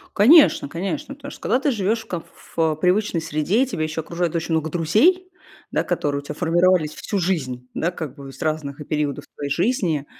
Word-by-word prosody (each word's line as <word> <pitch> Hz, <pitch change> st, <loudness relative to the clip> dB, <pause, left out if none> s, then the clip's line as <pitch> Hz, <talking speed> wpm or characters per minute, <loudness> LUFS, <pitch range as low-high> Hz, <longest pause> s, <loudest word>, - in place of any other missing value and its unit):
Конечно, 265 Hz, -, +6 dB
конечно. 185 Hz, -, -4 dB
Потому 280 Hz, 0 st, -9 dB
что -, -, -12 dB
когда 245 Hz, +4 st, +2 dB
ты 285 Hz, 0 st, +1 dB
живёшь 215 Hz, +1 st, 0 dB
в -, -, -24 dB
комф 175 Hz, -5 st, -4 dB
ф -, -, -19 dB
э, 160 Hz, -2 st, +2 dB
привычной 180 Hz, +1 st, +2 dB
среде, 160 Hz, -, +1 dB
тебя 200 Hz, -11 st, -3 dB
ещё 155 Hz, +1 st, -3 dB
окружает 170 Hz, +1 st, -2 dB
очень 165 Hz, 0 st, -1 dB
много 160 Hz, 0 st, 0 dB
друзей, 255 Hz, -, +3 dB, 0.4 s
да, -, -, +1 dB
которые 145 Hz, -1 st, -1 dB
у -, -, -7 dB
тебя 150 Hz, +1 st, -6 dB
формировались 175 Hz, -1 st, +2 dB
всю 205 Hz, -, -3 dB
жизнь, 130 Hz, -9 st, -2 dB
да, 170 Hz, -, -1 dB
как 155 Hz, -6 st, -6 dB
бы 140 Hz, -2 st, -10 dB
из 135 Hz, -, -13 dB
разных 155 Hz, -3 st, -2 dB
периодов 150 Hz, -3 st, -2 dB
твоей 145 Hz, -, -4 dB
жизни, 170 Hz, -, 0 dB
165 Hz, 200 wpm, -22 LUFS, 155-205 Hz, 0.4 s, Конечно